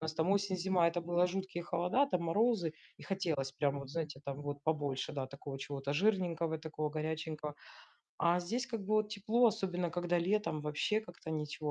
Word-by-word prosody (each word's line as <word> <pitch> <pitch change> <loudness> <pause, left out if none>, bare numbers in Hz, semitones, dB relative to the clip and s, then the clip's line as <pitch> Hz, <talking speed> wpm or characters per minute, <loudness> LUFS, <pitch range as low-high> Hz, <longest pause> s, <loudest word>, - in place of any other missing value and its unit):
у - - -6
нас 160 0 -2
там 160 +3 +2
осень-зима, 190 -3 +2
это 175 +1 -1
было 175 +1 +3
жуткие 190 -1 -3
холода, 180 +12 +2
там 180 -10 0
морозы, 210 -4 +3 0.3
и - - -12
хотелось 160 -9 -1
прям 140 -1 +1
вот 140 -1 -8
знаете, 150 -3 -3
там 140 +1 -4
вот 145 0 -3
побольше, 145 -4 0
да, 135 -2 -2
такого 140 0 -7
чего-то 140 0 -3
жирненького, 170 -3 +2
такого 155 -1 -3
горяченького. 155 -1 -3 0.6
А 170 +1 +4
здесь 235 +9 -1
как 230 -3 -3
бы - - -10
вот 215 -1 +3
тепло, 215 +4 +2
особенно 180 -5 0
когда 175 +1 +1
летом, 190 -4 +1
вообще 150 +8 +1
как-то 175 -6 -9
ничего 150 -1 -2
170 Hz, 185 wpm, -35 LUFS, 150-190 Hz, 0.6 s, А